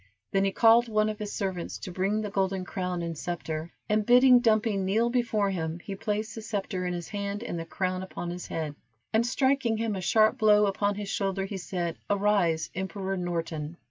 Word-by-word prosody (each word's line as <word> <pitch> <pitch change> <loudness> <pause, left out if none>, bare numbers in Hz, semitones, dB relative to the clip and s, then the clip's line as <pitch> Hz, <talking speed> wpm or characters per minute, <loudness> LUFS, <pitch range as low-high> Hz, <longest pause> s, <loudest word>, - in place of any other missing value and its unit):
Then 195 0 +2
he 195 - +1
called 230 +3 +5
one 215 0 +2
of 215 - -5
his 210 -1 -4
servants 190 -4 -3
to 185 - -7
bring 195 +4 0
the 210 -2 -4
golden 190 -1 0
crown 180 -2 -3
and 165 -1 -3
scepter, 160 0 -4 0.2
and 210 0 +2
bidding 250 +2 +7
Dumpy 220 -2 +2
kneel 200 +5 +1
before 225 -5 +1
him, 160 -3 -3
he 195 +3 -7
placed 215 +2 -2
the 225 - -7
scepter 195 -4 -3
in 180 - -2
his 175 -1 -6
hand 200 +1 -3
and 175 -8 -4
the 165 - -5
crown 185 +1 -2
upon 175 -2 -5
his 180 0 -6
head, 155 -2 -3 0.4
and 220 +1 +4
striking 255 -1 +1
him 225 -2 -1
a 190 - -4
sharp 220 +7 +3
blow 210 -1 +5
upon 205 +1 0
his 205 -1 -5
shoulder, 195 -1 -1
he 195 0 -5
said, 175 -2 -3
"Arise, 200 -5 +2
Emperor 190 +1 -3
Norton. 165 -3 -3
195 Hz, 205 wpm, -28 LUFS, 180-215 Hz, 0.4 s, bidding